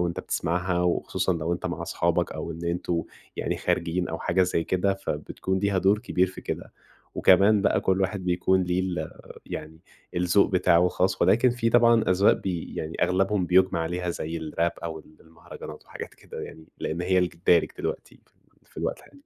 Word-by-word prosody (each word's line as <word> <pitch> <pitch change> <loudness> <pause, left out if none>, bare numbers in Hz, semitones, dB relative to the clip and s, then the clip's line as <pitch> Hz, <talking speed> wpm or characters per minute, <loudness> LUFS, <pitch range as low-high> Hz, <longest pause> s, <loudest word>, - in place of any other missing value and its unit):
وأنت 85 -1 -1
بتسمعها، 90 +2 -1
وخصوصًا 95 +1 0
لو 80 +1 -2
أنت 85 - -3
مع - - -4
أصحابك - - 0
أو 85 - -5
إن 85 +1 -8
أنتم 85 0 -1 0.3
يعني - - -2
خارجين 90 +2 -1
أو 80 - -4
حاجة 95 +2 +2
زي 85 -2 0
كده، 95 +2 +1
فبتكون 95 +1 -3
ليها 100 -1 +1
دور 100 +3 +3
كبير 95 -5 +1
في 95 - -9
كده. - - -5 0.4
وكمان 100 0 +5
بقى - - +2
كل 95 0 +1
واحد 95 0 -1
بيكون 90 +1 +2
ليه 90 +1 0
ال 90 -4 -3 0.4
يعني 80 +1 -7 0.4
الذوق 90 +3 +3
بتاعه 90 -1 +4
خاص، 95 +1 0
ولكن 120 +3 +4
في 120 -1 0
طبعًا 115 -1 +5
أذواق 95 +2 +5
بي 90 -4 -4
يعني 80 +1 -4
أغلبهم 95 0 +1
بيُجمع 95 -1 +3
عليها، 90 +2 -2
زي 80 0 -4
الراب 80 +2 -1
أو 80 -1 -4
ال 80 0 -18
المهرجانات 80 +1 -11
وحاجات - - -9
كده - - -10
يعني؛ 80 - -11
لأن 85 +3 -3
هي 90 +1 +3
ج 85 - -10
الدارج 85 0 +3
دلوقتي - - -5
في - - -34 0.4
في - - -27
الوقت - - -2
الحالي. 140 0 -19
90 Hz, 185 wpm, -26 LUFS, 85-95 Hz, 0.4 s, وكمان